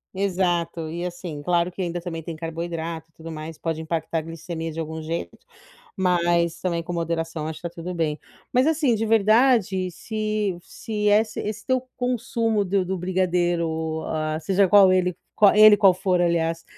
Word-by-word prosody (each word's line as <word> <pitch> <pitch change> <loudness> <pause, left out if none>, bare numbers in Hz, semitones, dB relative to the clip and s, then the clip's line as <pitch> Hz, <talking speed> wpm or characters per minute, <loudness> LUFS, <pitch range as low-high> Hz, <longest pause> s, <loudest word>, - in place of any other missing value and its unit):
Exato. 175 -4 0
E 170 +1 -4
assim, 175 -4 -7
claro 175 +3 +1
que 185 - -6
ainda 175 -1 -2
também 170 -2 -5
tem 165 +1 -6
carboidrato 165 0 -5
e - - -36
tudo 165 0 -9
mais, 155 0 -7
pode 160 -1 -3
impactar 160 0 -2
a - - -4
glicemia 165 0 -6
de 160 - -7
algum 160 0 -4
jeito, 155 - -4 0.6
mas 170 -2 +1
também, 170 -2 -1
com 175 - -5
moderação 165 -2 -2
acho 160 - -6
que 175 - -3
tá - - -24
tudo 175 +2 -5
bem, 155 -3 -1 0.4
mas 255 +3 +4
assim, 300 -6 +2
de 220 +1 -1
verdade, 215 -3 +3
se 215 +1 -2
se 210 +2 -3
é 205 +1 +6
ess 220 0 -7
esse 210 0 -4
teu 260 -1 +1 0.2
consumo 230 -3 0
do 190 0 +1
do 190 - -2
brigadeiro 175 -2 0
o 160 0 -3
ó 155 0 -2
seja 190 +4 +2
qual 195 -1 +7
ele 180 -1 +1 0.2
qua 210 0 +5
ele 215 0 +9
qual 195 -3 +6
for, 185 -1 +1
aliás, 165 -1 0
175 Hz, 185 wpm, -24 LUFS, 165-200 Hz, 0.6 s, ele